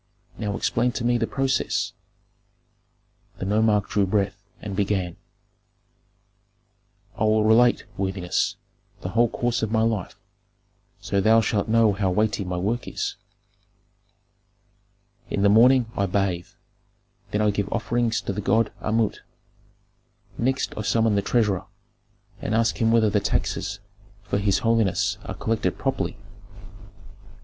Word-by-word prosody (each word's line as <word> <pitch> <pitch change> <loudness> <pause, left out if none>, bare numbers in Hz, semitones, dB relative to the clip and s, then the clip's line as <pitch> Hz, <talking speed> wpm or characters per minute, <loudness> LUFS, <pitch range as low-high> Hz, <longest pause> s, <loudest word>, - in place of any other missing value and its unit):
Now 105 -2 -3
explain 125 +1 +1
to 120 - -3
me 120 0 +2
the 115 - 0
process." 135 -1 -1 1.4
The - - -4
nomarch 105 0 +2
drew 100 -2 +1
breath 100 0 -1 0.2
and 100 -2 -6
began, 95 -3 -1 2.0
"I 110 0 0
will 110 0 +3
relate, 120 +3 +4
worthiness, 95 -2 -1 0.5
the 90 - -4
whole 115 +3 +3
course 120 +1 -1
of 110 -1 -2
my 110 0 +2
life, 110 -5 -2 0.8
so 100 - 0
thou 110 +3 +5
shalt 105 -2 0
know 110 -1 +4
how 95 -1 0
weighty 105 +2 0
my 90 -1 -3
work 110 +7 -2
is. - - -3 2.1
"In 100 - -1
the 100 - +5
morning 125 +4 +6
I 100 - 0
bathe, 90 -2 -1 0.8
then 105 - -1
I 105 - +3
give 100 -1 -3
offerings 120 -1 0
to - - -3
the 105 - -3
god 110 +2 +2
Amut; 110 -1 0 1.2
next 130 +3 -1
I - - -3
summon 110 +1 +2
the 100 - +2
treasurer, 105 -3 0 0.7
and 110 - -1
ask 115 0 +1
him 115 0 +3
whether 110 -2 +4
the 105 - +3
taxes 100 0 -2 0.5
for 100 0 -1
his 100 -1 +2
holiness 115 -4 +1
are - - -5
collected 110 -5 -1
properly. - - -2
105 Hz, 135 wpm, -24 LUFS, 100-115 Hz, 2.1 s, morning